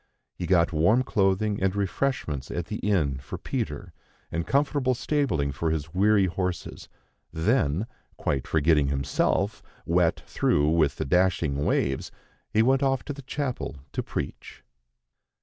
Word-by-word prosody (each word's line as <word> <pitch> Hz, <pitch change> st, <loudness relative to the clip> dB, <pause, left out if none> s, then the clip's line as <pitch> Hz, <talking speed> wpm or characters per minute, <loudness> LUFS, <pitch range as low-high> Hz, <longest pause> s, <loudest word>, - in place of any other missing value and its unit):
He 90 Hz, -, -5 dB
got 85 Hz, -1 st, +3 dB
warm 90 Hz, +11 st, +4 dB
clothing, 100 Hz, -2 st, +1 dB
and 95 Hz, 0 st, +1 dB
refreshments 100 Hz, -, -1 dB
at 85 Hz, -, -3 dB
the 105 Hz, +4 st, -4 dB
inn 75 Hz, -10 st, 0 dB
for 65 Hz, -, -7 dB
Peter, -, -, -4 dB, 0.4 s
and 85 Hz, +1 st, -2 dB
comfortable 140 Hz, -2 st, +1 dB
stabling 115 Hz, -, 0 dB
for 80 Hz, +4 st, -2 dB
his 80 Hz, 0 st, -3 dB
weary 100 Hz, +1 st, +4 dB
horses; 90 Hz, 0 st, -4 dB, 0.4 s
then, 95 Hz, -, +1 dB, 0.3 s
quite 65 Hz, -3 st, -1 dB
forgetting 75 Hz, -2 st, +3 dB
himself, 70 Hz, -, 0 dB, 0.2 s
wet -, -, +2 dB
through 75 Hz, +1 st, +2 dB
with 80 Hz, -3 st, +2 dB
the -, -, -3 dB
dashing 75 Hz, -3 st, +1 dB
waves, 70 Hz, -1 st, 0 dB, 0.4 s
he 110 Hz, +1 st, +4 dB
went 130 Hz, +2 st, +3 dB
off 135 Hz, -2 st, +1 dB
to 145 Hz, -, -4 dB
the 140 Hz, -, -9 dB
chapel 135 Hz, -, -3 dB, 0.2 s
to -, -, -2 dB
preach. -, -, -6 dB
90 Hz, 140 wpm, -26 LUFS, 75-110 Hz, 0.4 s, warm